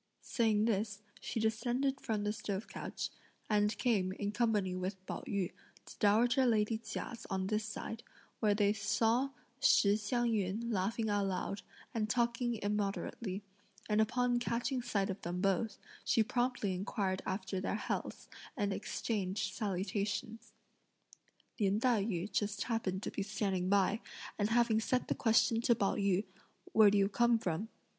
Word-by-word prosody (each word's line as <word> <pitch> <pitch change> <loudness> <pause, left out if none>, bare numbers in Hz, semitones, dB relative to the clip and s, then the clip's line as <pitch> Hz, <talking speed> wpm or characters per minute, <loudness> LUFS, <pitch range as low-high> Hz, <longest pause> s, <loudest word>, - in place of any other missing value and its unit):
Saying 220 -3 +2
this, 210 -2 -1 0.2
she - - -3
descended 245 +5 0
from 215 -2 -1
the 210 0 0
stove 210 -2 -4
couch, - - -5 0.4
and 210 0 +2
came, 205 -7 +2
in 205 +1 -2
company 210 -4 +1
with 185 +2 -2
Pao - - -4
yü, 195 -4 -1 0.3
to - - -11
dowager 235 +5 +4
lady 220 -1 +2
Chia's 230 0 -6
on 190 -2 -1
this 215 +2 0
side, 225 +1 -5 0.4
where 210 -2 +3
they 205 -1 +3
saw 225 +5 +2 0.3
Shih 200 0 +5
Hsiang 235 +3 0
yün 215 +3 -1
laughing 215 +4 0
aloud, 200 -1 -1 0.3
and 215 -2 -1
talking 240 0 +1
immoderately; 205 0 -2 0.4
and 210 0 +3
upon 245 +2 +2
catching 240 +2 -1
sight 205 -5 0
of 190 - -7
them 175 +1 -3
both, 195 +4 +1 0.3
she 225 0 +3
promptly 240 -3 0
inquired 190 0 -1
after 190 0 -2
their 200 - -1
healths, 215 - -3 0.3
and 205 -3 0
exchanged 200 -2 -2
salutations. 205 +3 -2 1.1
Lin 200 0 +2
Tai 230 -4 +2
yü 195 -2 -2
just 205 0 0
happened 210 -5 -2
to - - -3
be - - -3
standing 195 -2 -1
by, 200 +2 +3 0.4
and 205 +1 +2
having 230 -1 +3
set 250 +3 0
the - - +3
question 225 0 +3
to 235 0 +4
Pao 200 -3 +1
yü 200 -1 +2 0.5
"Where 215 -2 +7
do 205 - +3
you 195 -1 +4
come 235 +2 +3
from?" 195 +1 -2
210 Hz, 150 wpm, -34 LUFS, 200-230 Hz, 1.1 s, Where